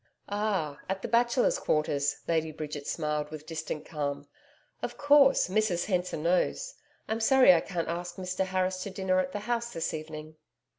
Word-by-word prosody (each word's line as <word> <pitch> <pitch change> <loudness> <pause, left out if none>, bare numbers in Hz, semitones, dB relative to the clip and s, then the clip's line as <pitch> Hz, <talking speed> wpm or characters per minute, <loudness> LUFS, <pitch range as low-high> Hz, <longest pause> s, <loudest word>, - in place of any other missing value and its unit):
'Ah! 200 -8 -1
at 190 0 -2
the - - -2
Bachelors' 240 +1 +2
Quarters,' 145 -2 0
Lady 160 -1 +1
Bridget 150 -2 -6
smiled 150 -2 -2
with 155 -1 -8
distant 160 -2 -5
calm. 145 -2 -4 0.5
'Of - - -4
course, 285 -1 +5
Mrs 190 -3 +1
Hensor 180 -3 -1
knows. 180 - 0 0.3
I'm 220 +1 -1
sorry 255 -3 +7
I 170 - +3
can't 175 -3 -3
ask 175 +1 -4
Mr 185 0 -2
Harris 185 0 0
to 200 - -4
dinner 190 -1 0
at 185 0 -1
the 205 - -4
house 235 +1 -2
this 165 -4 -3
evening.' 155 0 -7
180 Hz, 165 wpm, -29 LUFS, 155-205 Hz, 0.5 s, sorry